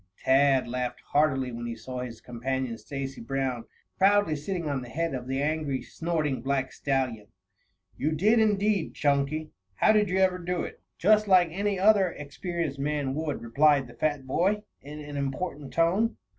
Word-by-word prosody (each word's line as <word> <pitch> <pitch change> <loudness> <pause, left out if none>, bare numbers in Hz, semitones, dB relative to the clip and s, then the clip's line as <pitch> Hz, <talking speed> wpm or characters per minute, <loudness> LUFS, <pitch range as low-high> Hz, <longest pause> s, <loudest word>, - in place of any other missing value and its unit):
Tad 135 -1 +3
laughed 125 0 -3
heartily 135 -4 +2
when 120 0 -5
he 115 - -4
saw 125 +3 -7
his 120 -3 -6
companion, 125 0 -3
Stacy 135 -1 -6
Brown, 130 -1 -2 0.3
proudly 195 -4 +4
sitting 170 +3 -3
on 140 -3 -1
the 125 - -9
head 165 +6 -2
of 125 -1 -5
the 135 +1 -1
angry, 150 -3 -1
snorting 155 -6 -2
black 135 0 -1
stallion. 130 -6 -1 0.7
"You 155 +3 0
did, 210 +9 +3
indeed, 210 -3 +1
Chunky. 145 +2 0 0.2
How 215 - +4
did 210 -2 +3
you 185 - 0
ever 185 -1 +3
do 175 0 -2
it?" - - -8 0.2
"Just 215 +3 +4
like 185 -3 +5
any 200 +2 -1
other 200 -2 +5
experienced 155 0 -4
man 145 -1 -1
would," 150 -3 -3
replied 140 +4 +3
the 120 - -13
fat 145 +2 -1
boy, 195 +10 +1 0.2
in 150 +2 -9
an 145 -1 -7
important 140 +1 -3
tone. 185 +8 +2
145 Hz, 170 wpm, -27 LUFS, 130-180 Hz, 0.7 s, like